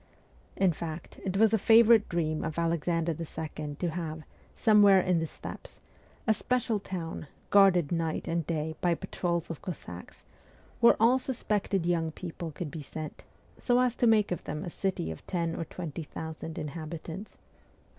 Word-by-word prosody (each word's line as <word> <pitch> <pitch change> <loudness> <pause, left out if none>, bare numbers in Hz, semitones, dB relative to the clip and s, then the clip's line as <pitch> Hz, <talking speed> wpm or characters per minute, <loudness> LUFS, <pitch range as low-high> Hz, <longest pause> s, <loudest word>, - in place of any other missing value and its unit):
In 190 -3 +3
fact, 160 0 -7
it 190 0 -1
was 220 +1 +5
a 220 - +4
favourite 225 +1 +6
dream 155 -2 -1
of 160 -1 -4
Alexander 165 0 +1
II. 155 -2 -5
to 175 +3 -1
have, 160 -2 -4 0.3
somewhere 205 -3 +6
in 180 -2 +2
the 165 - -1
steppes, - - -10 0.5
a 220 - +4
special 235 -1 0
town, 170 -5 -5 0.2
guarded 190 -6 +5
night 165 -2 -1
and 165 0 0
day 160 -1 -1
by 175 -1 +3
patrols 170 0 -2
of 165 - -7
Cossacks, 90 - -8 0.6
where 235 - +7
all 240 +4 +5
suspected 210 -8 -1
young 165 -2 +1
people 170 0 -6
could 155 0 -6
be 160 - -6
sent, 155 +2 -7 0.4
so 245 0 +3
as 250 -1 +2
to 240 - +3
make 215 -3 +4
of 175 - -3
them 150 +1 -4
a 175 - -5
city 185 - -2
of 80 - -9
ten 170 -2 -1
or 165 - -3
twenty 165 -2 -6
thousand 160 +1 -7
inhabitants. 160 +5 -6
170 Hz, 165 wpm, -29 LUFS, 160-195 Hz, 0.6 s, where